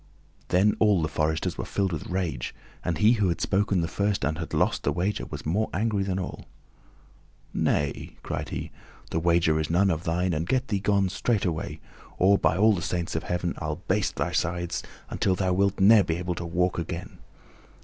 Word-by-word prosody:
Then 100 +4 +3
all 105 -6 +4
the - - +1
foresters 75 +1 -1
were - - -1
filled 100 -2 -1
with 80 - -4
rage, 90 -10 -3 0.3
and 85 -3 -1
he 105 +6 +5
who 105 -6 +2
had 85 - -1
spoken 100 -2 +1
the 85 - 0
first 100 +4 -1
and 80 +2 -1
had 85 - -5
lost - - +1
the - - 0
wager 95 +4 -1
was - - -7
more 100 +8 0
angry 105 0 +1
than 95 -1 -1
all. 95 - -5 1.1
"Nay," 75 -2 -1
cried - - -4
he, - - -5 0.4
"the 80 - 0
wager 85 -2 +3
is 80 - -2
none 95 +3 +3
of 80 0 -2
thine, 90 +1 0
and 80 +2 -2
get 130 0 +1
thee 100 -3 +1
gone, 100 -1 +2
straightway, 95 -6 -1 0.4
or, 100 +2 +4
by 80 +2 +2
all 110 +2 +5
the 90 - -2
saints 85 -1 -2
of 80 - 0
heaven, 90 -1 -2
I'll 75 -2 -4
baste - - +1
thy - - -1
sides 85 0 -1 0.3
until 95 - +1
thou 90 0 0
wilt 100 +1 +1
ne'er 105 +2 +7
be 80 - -1
able 90 +1 -2
to 85 0 -5
walk 90 +1 0
again." 85 +1 -6
90 Hz, 200 wpm, -26 LUFS, 85-100 Hz, 1.1 s, ne'er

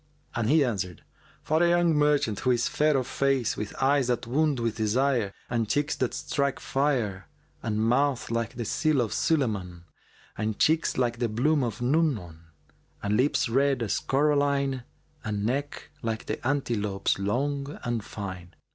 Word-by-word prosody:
and 120 -2 -1
he 150 -1 +5
answered, 95 -7 -3 0.4
"For 155 +2 +1
a 175 - +5
young 175 -1 +3
merchant, 150 -8 +2
who 130 - 0
is 120 -2 +2
fair 150 -1 +2
of 130 - 0
face, 135 -2 0
with 105 -1 -5
eyes 135 -1 +3
that 125 -2 0
wound 145 +2 +1
with 115 -2 -1
desire, 115 0 +1 0.2
and 115 -3 -1
cheeks 145 +5 +1
that 130 - -1
strike 140 -2 -1
fire 120 - -1 0.3
and 110 -2 -2
mouth 125 +3 +1
like 115 -2 -2
the 120 -1 -4
seal 155 +4 +1
of 115 -4 0
Sulaymбn 100 - 0 0.5
and 110 0 -2
cheeks 160 +1 +2
like 120 -2 0
the 120 -2 0
bloom 140 +7 +2
of 120 0 -3
Nu'mбn 125 - +1 0.7
and 105 +1 +1
lips 130 +3 +2
red 135 +1 +2
as 105 - 0
coralline 140 -2 +1 0.4
and 105 -1 -2
neck 140 +5 -3
like 110 -2 -3
the - - -3
antelope's 105 -10 0
long 140 +8 -1
and 120 -3 -2
fine. 90 -5 -7
125 Hz, 160 wpm, -27 LUFS, 110-140 Hz, 0.7 s, he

